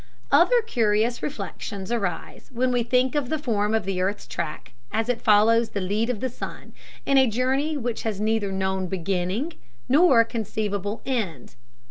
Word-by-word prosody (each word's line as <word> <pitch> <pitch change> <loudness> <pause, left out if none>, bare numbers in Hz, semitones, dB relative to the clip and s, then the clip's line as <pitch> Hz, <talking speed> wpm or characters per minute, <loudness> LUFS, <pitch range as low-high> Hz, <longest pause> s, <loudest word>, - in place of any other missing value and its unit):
Other - - +5
curious 230 - +1
reflections 205 -8 -5
arise 200 -8 -3
when 255 +1 0
we 245 -1 +2
think 250 +2 +2
of 290 -4 -1
the 315 - 0
form 220 -7 0
of 220 - 0
the 190 -1 -1
earth's 200 +2 -1
track 150 - -5 0.2
as 225 +2 -1
it 245 -2 0
follows 225 +2 +4
the 200 - -3
lead 205 +5 -1
of 240 -5 -2
the 260 - 0
sun, 245 - -8 0.3
in 275 -1 +4
a 265 - +5
journey 265 +7 0
which 240 -3 -3
has 215 -3 -3
neither 215 -2 0
known 190 -1 -1
beginning 190 - -2 0.3
nor 270 -5 +6
conceivable 215 -2 -3
end. 205 - -3
225 Hz, 165 wpm, -24 LUFS, 200-250 Hz, 0.3 s, nor